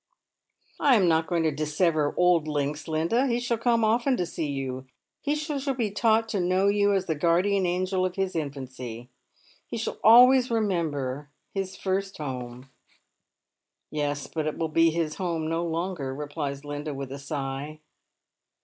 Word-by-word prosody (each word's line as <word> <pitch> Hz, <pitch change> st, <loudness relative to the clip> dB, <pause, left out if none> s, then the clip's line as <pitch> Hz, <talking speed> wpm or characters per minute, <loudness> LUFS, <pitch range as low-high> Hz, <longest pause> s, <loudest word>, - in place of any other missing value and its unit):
" -, -, -42 dB
I 275 Hz, -3 st, +5 dB
am 195 Hz, -5 st, +4 dB
not 160 Hz, -1 st, +2 dB
going 170 Hz, -2 st, 0 dB
to 160 Hz, -, +2 dB
dissever 150 Hz, +1 st, +1 dB
old 175 Hz, -3 st, +3 dB
links, 150 Hz, +1 st, -2 dB
Linda. 165 Hz, -, +1 dB
He 240 Hz, -1 st, +1 dB
shall 240 Hz, -2 st, -1 dB
come 230 Hz, -1 st, +2 dB
»ften 240 Hz, +4 st, +2 dB
to 180 Hz, -, 0 dB
see 160 Hz, -2 st, -4 dB
you. 130 Hz, -2 st, -4 dB, 0.3 s
He 295 Hz, +1 st, 0 dB
shall 295 Hz, -3 st, -2 dB
be 225 Hz, -5 st, -1 dB
taught 225 Hz, +2 st, +2 dB
to 205 Hz, -, -1 dB
know 185 Hz, +2 st, +2 dB
you 205 Hz, 0 st, +3 dB
as 195 Hz, -2 st, +1 dB
the 160 Hz, -, 0 dB
guardian 180 Hz, +5 st, +2 dB
angel 185 Hz, +1 st, 0 dB
of 185 Hz, -1 st, -1 dB
his 190 Hz, -1 st, -2 dB
infancy; 130 Hz, -5 st, -6 dB, 0.6 s
he -, -, -5 dB
shall 225 Hz, -, -4 dB
always 250 Hz, +3 st, +7 dB
remember 155 Hz, -, -1 dB, 0.2 s
his 190 Hz, -1 st, -3 dB
first 195 Hz, 0 st, -2 dB
home." 125 Hz, -2 st, -6 dB, 0.6 s
" -, -, -59 dB
Yes, 145 Hz, -2 st, -2 dB
but 155 Hz, -2 st, -3 dB
it 155 Hz, -, -3 dB
will 165 Hz, -1 st, -1 dB
be 165 Hz, +2 st, +4 dB
his 160 Hz, -1 st, -2 dB
home 170 Hz, -4 st, -2 dB
no 165 Hz, +1 st, -1 dB
longer," 165 Hz, -5 st, -3 dB
replies 145 Hz, -1 st, -5 dB
Linda, 145 Hz, 0 st, -5 dB
with 135 Hz, -1 st, -6 dB
a 140 Hz, -, -6 dB
sigh. 140 Hz, +1 st, -5 dB
165 Hz, 170 wpm, -26 LUFS, 145-200 Hz, 0.6 s, always